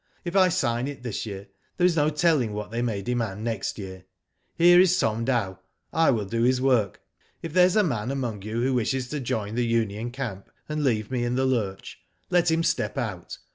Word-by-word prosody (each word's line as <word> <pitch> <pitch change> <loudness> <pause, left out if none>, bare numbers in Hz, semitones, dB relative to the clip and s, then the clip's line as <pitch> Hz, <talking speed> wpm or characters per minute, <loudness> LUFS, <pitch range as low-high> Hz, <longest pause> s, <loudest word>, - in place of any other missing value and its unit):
If 175 +2 -4
I 185 -2 +6
sign 125 -8 0
it 140 -3 -7
this 120 -2 -4
year 100 -1 -7 0.3
there 175 - +3
is 180 -2 +3
no 150 -1 +3
telling 150 -7 +1
what 105 0 -5
they 115 +1 -2
may 110 -5 -2
demand 110 -3 -2
next 110 -4 -3
year. 95 -2 -8 0.5
Here 175 +1 +6
is 185 0 +5
Tom 110 +1 0
Dow. 110 -8 -1 0.3
I 165 +1 +4
will 110 -6 +1
do 115 +4 -2
his 125 +2 +3
work. 125 -7 +1 0.4
If 165 -2 -5
there 180 0 +6
is 185 - -1
a 215 - +5
man 120 - -2
among 125 -7 -3
you 110 +4 -3
who 130 +1 +1
wishes 125 +1 -1
to 150 - -3
join 110 -5 -3
the 120 +1 0
union 115 -1 -1
camp, 120 -7 -6 0.2
and 150 0 -2
leave 110 -4 0
me 125 -2 -1
in 120 +1 -1
the 130 +1 +1
lurch, 110 -7 -2 0.3
let 175 -1 +3
him 165 +1 +2
step - - -1
out. - - -4
120 Hz, 215 wpm, -25 LUFS, 110-150 Hz, 0.5 s, I